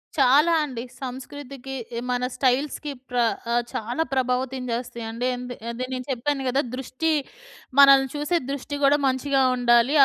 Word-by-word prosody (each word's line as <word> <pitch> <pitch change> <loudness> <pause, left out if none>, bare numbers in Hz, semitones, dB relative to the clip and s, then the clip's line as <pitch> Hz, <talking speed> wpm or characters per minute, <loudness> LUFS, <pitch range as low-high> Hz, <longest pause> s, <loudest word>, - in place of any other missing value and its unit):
చాలా 290 +4 +5
అండి. 255 -5 -5 0.2
సంస్కృతికి 270 +1 -7 0.4
మన 250 0 0
స్టైల్స్‌కి 280 +3 0 0.2
ప్ర 250 - -3 0.4
ఆహ్, 240 0 +2
చాలా 240 +8 -1
ప్రభావితం 260 0 0
చేస్తాయండి. 235 0 -4
ఎందు 245 0 -6 0.2
అదే 250 +2 -4
నేను 255 0 -4
చెప్పాను 270 +3 -1
గదా! 265 +3 +2
దృష్టి 265 +5 -2 0.7
మనల్ని 275 -1 +8
చూసే 295 +4 0
దృష్టి 280 +1 -4
కూడా 280 +1 +5
మంచిగా 270 +1 +1
ఉండాలి. 240 +1 +4
260 Hz, 130 wpm, -24 LUFS, 245-280 Hz, 0.7 s, మనల్ని